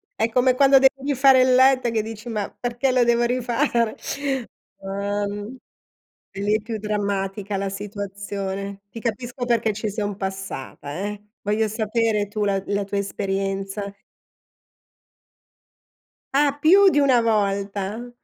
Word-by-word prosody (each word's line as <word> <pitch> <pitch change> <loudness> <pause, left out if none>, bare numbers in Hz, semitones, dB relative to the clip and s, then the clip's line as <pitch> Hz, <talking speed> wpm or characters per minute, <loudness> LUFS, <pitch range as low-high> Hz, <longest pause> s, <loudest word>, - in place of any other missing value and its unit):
È 230 - +1
come 250 +2 +3
quando 275 0 +6
devi 270 +1 +2
fare 265 0 +6
il 255 0 +4
letto 260 -1 +5
e - - 0
che 225 -1 +1
dici: 220 +1 -8
"Ma 210 -3 -2
perché 245 +2 -1
lo 250 -1 +4
devo 235 0 +3
rifare". 240 -1 0 0.8
Uhm, 205 +3 -4 0.8
lì 200 +2 0
è 215 - -1
più 220 +1 -5
drammatica 200 -1 -2
la 195 0 -2
situazione. 200 -1 -5
Ti 230 - -8
capisco 240 +2 -3
perché 230 -3 +1
ci 215 +1 -3
son 205 -1 -3
passata, 190 -8 -6
eh. 205 +1 -4 0.2
Voglio 210 +2 +1
sapere 215 -1 0
tu 210 +1 -3
la 195 -1 +1
la 200 0 0
tua 200 +1 -4
esperienza. 195 0 -3 2.4
Ah, 285 0 +3
più 385 +6 +7
di 295 - +2
1 270 -4 +4
volta. 205 +1 -1
210 Hz, 135 wpm, -23 LUFS, 200-245 Hz, 2.4 s, più